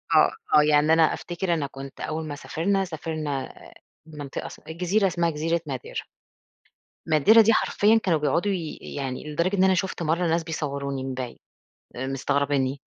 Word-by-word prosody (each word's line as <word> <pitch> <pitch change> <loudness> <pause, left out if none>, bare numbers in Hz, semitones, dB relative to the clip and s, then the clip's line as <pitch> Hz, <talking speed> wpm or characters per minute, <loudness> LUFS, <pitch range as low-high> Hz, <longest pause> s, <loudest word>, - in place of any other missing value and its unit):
آه، - - +6 0.3
آه. - - +6
يعني 150 +1 +4
أنا 160 -1 +4
أفتكر 175 0 -2
أنا 145 -4 -1
كنت 135 0 -10
أول 155 0 -3
ما 145 - -5
سافرنا، 190 +6 -1
سافرنا 155 -5 -4 0.5
منطقة 145 -3 -7
اس - - -11
جزيرة 185 +5 +1
اسمها 170 -1 0
جزيرة 165 +2 -1
madeira. 130 -2 -4 1.1
madeira 215 +10 +7
دي 225 +1 +5
حرفيًا 220 +1 +3
كانوا 165 -5 +2
بيقعدوا 170 +8 +1
ي 165 -5 -4 0.2
يعني 135 +2 -4
لدرجة 185 +6 0
إن 190 - +4
أنا 190 0 +4
شُفت 185 -2 -2
مرّة 170 +2 +1
ناس 165 +1 +1
بيصوّروني 140 -4 -3
من 135 -1 -4
بعيد، 125 -2 -6 0.6
آآ، 130 +2 -4
مستغربينّي. 140 0 0
155 Hz, 160 wpm, -25 LUFS, 140-175 Hz, 1.1 s, madeira